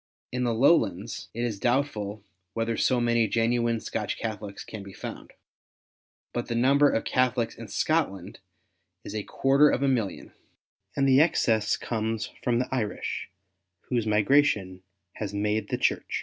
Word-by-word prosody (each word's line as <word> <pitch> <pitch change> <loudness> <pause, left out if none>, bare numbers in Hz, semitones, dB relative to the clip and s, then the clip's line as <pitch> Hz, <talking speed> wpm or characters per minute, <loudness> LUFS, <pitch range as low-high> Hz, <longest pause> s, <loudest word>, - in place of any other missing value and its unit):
In 125 0 -1
the 120 - +1
Lowlands 120 - +2
it 120 - -2
is 110 -5 -2
doubtful 110 -5 -1 0.3
whether 115 0 -1
so 125 +2 +2
many 120 -1 +2
genuine 115 +1 +1
Scotch - - -3
Catholics 105 -3 -5
can 110 - -8
be 100 -1 -10
found; - - -8 1.0
but 120 - -3
the 115 - -2
number 140 +4 +4
of 115 - 0
Catholics 125 -2 +1
in 115 - -9
Scotland 105 - -1 0.6
is - - -7
a 110 - -2
quarter 135 +7 +3
of 135 - 0
a - - +3
million, 115 -7 -1 0.6
and 135 -1 +2
the 135 +1 +6
excess 115 -9 +2
comes 110 -1 -3
from 120 -1 +2
the 125 +1 0
Irish, 110 -5 -3 0.6
whose 120 -3 0
migration 105 -4 +2 0.4
has 105 -2 -4
made 105 +1 0
the - - -1
Church. - - 0
115 Hz, 150 wpm, -27 LUFS, 105-130 Hz, 1.0 s, the